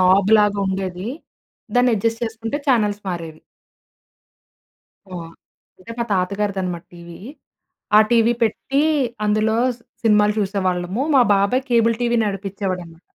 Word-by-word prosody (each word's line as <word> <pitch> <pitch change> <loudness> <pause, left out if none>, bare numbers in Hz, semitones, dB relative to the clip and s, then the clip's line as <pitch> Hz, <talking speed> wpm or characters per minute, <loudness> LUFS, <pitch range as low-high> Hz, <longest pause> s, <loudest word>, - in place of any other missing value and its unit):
నాబ్‌లాగుండేది. 195 0 +2 0.7
దాన్నెడ్జస్ట్ 230 -2 +1
చేసుకుంటే 225 +4 -4
ఛానల్స్ 210 -5 +1
మారేవి. 165 -3 -6 1.7
ఆ! - - -13 0.7
అంటే, 185 - -13
మా 235 - 0
తాతగారిదనమాట 190 -2 -2
టీవీ. 170 -1 -11 0.8
ఆ - - +9
టీవీ 235 0 +4
పెట్టీ, 270 +6 0 0.4
అందులో 215 +1 +1 0.5
సినిమాలు 210 -2 +3
చూసేవాళ్ళము. 190 +1 -1
మా 255 - +7
బాబాయ్ 200 +7 +1
కేబుల్ 230 -1 +3
టీవీ 240 0 +1
నడిపిచ్చేవాడనమాట. 190 -4 -4
205 Hz, 95 wpm, -20 LUFS, 185-225 Hz, 1.7 s, ఆ